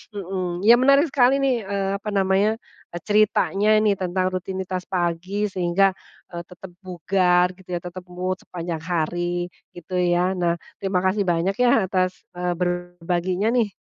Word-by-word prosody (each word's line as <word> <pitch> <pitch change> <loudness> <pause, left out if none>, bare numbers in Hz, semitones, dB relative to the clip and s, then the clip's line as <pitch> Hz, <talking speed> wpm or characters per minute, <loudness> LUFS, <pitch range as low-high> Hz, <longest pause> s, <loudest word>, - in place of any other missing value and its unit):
mhm, 185 -2 -4
ya 235 +3 +7
menarik 275 +3 +4
sekali 270 +1 +3
nih, 240 -7 0
eee, 195 -1 -1
apa 210 - -11
namanya 195 +3 +2 0.5
ceritanya 210 0 +2
ini 200 -2 +2
tentang 185 0 -1
rutinitas 185 0 -4
pagi 185 +3 -1
sehingga, 185 +2 +2 0.4
eee, 170 0 -6
tetep 180 0 -12
bugar 180 0 +1
gitu 180 -1 -6
ya, - - -2
tetep 180 +1 -8
mood 180 +1 -3
sepanjang 170 -2 -5
hari 175 +1 -2 0.2
gitu, 180 +1 -4
ya. 175 +1 +2
Nah, 170 -1 +1 0.2
terima 190 -2 -1
kasih 190 0 +1
banyak 175 +3 +1
ya 240 -4 +4
atas, 185 -1 -1
eee, 180 0 -2
berbaginya, 175 +3 -1
nih. 230 -5 +1
185 Hz, 145 wpm, -23 LUFS, 175-200 Hz, 0.5 s, ya